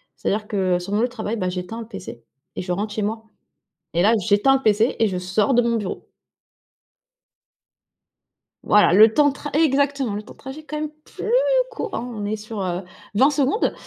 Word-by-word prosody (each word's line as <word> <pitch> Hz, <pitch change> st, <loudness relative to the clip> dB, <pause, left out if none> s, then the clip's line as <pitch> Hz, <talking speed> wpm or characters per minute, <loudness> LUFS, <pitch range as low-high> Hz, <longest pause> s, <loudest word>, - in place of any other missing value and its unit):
C'est-à-dire 210 Hz, +1 st, -2 dB
que 185 Hz, -4 st, 0 dB
sur 185 Hz, +3 st, -6 dB
mon 210 Hz, -, +2 dB
lieu 245 Hz, -, +2 dB
de -, -, -15 dB
travail, 225 Hz, -2 st, -4 dB
ben, 185 Hz, -3 st, -1 dB
j'éteins 180 Hz, +5 st, -5 dB
le 225 Hz, -, -9 dB
PC 190 Hz, -, -9 dB, 0.3 s
et -, -, -3 dB
je 180 Hz, 0 st, -4 dB
rentre 205 Hz, +4 st, -2 dB
chez 215 Hz, -, -2 dB
moi 220 Hz, +2 st, -3 dB, 0.7 s
et 170 Hz, -, +2 dB
là, 220 Hz, -, +5 dB
j'éteins 210 Hz, +7 st, +3 dB
le -, -, -9 dB
PC 215 Hz, +2 st, +3 dB
et 225 Hz, -, +4 dB
je 185 Hz, -, -3 dB
sors 190 Hz, +7 st, +1 dB
de 245 Hz, -, +5 dB
mon 235 Hz, 0 st, +1 dB
bureau. 205 Hz, -4 st, -5 dB, 2.6 s
Voilà 210 Hz, -4 st, +5 dB
le 215 Hz, +3 st, +7 dB
temps 295 Hz, -1 st, +5 dB
de 275 Hz, -, -2 dB
tr 290 Hz, -, -7 dB
exactement, 280 Hz, -5 st, +2 dB
le 205 Hz, -, -4 dB
temps -, -, -13 dB
de -, -, -24 dB
trajet 270 Hz, +4 st, -9 dB
quand 305 Hz, 0 st, -5 dB
même 305 Hz, -1 st, -3 dB
plus 440 Hz, -, -6 dB, 0.4 s
court, 445 Hz, -2 st, -5 dB
hein, 230 Hz, -, -3 dB
on 210 Hz, -3 st, -5 dB
est 210 Hz, -, -1 dB
sur, 215 Hz, 0 st, -7 dB
heu, 180 Hz, 0 st, -2 dB, 0.3 s
20 265 Hz, +8 st, +5 dB
secondes. 290 Hz, -, +1 dB
215 Hz, 210 wpm, -22 LUFS, 200-265 Hz, 2.6 s, le